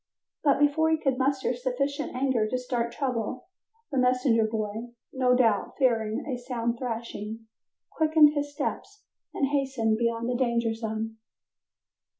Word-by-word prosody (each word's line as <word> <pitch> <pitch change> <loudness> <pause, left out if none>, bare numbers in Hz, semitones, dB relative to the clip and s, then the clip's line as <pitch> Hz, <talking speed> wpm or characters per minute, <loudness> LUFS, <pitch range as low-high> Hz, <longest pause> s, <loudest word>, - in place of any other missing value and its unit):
But 285 -2 +4
before 290 +3 +3
he 320 - +3
could 270 -4 0
muster 265 -1 +1
sufficient 260 +3 -2
anger 255 -4 +1
to 255 - -1
start 245 -2 -2
trouble, 250 -2 -3 0.5
the 270 - +1
messenger 250 -2 +3
boy, 220 +1 -3 0.3
no 255 -1 +3
doubt 225 -5 +2
fearing 225 -5 +1
a 255 -4 -3
sound 235 -2 -2
thrashing, 225 -2 -5 0.5
quickened 310 -1 +5
his 290 -1 -2
steps 405 +8 -4 0.3
and 275 - 0
hastened 265 -6 0
beyond 235 0 0
the 250 - 0
danger 235 -2 +1
zone. 225 0 -4
250 Hz, 140 wpm, -27 LUFS, 230-275 Hz, 0.5 s, quickened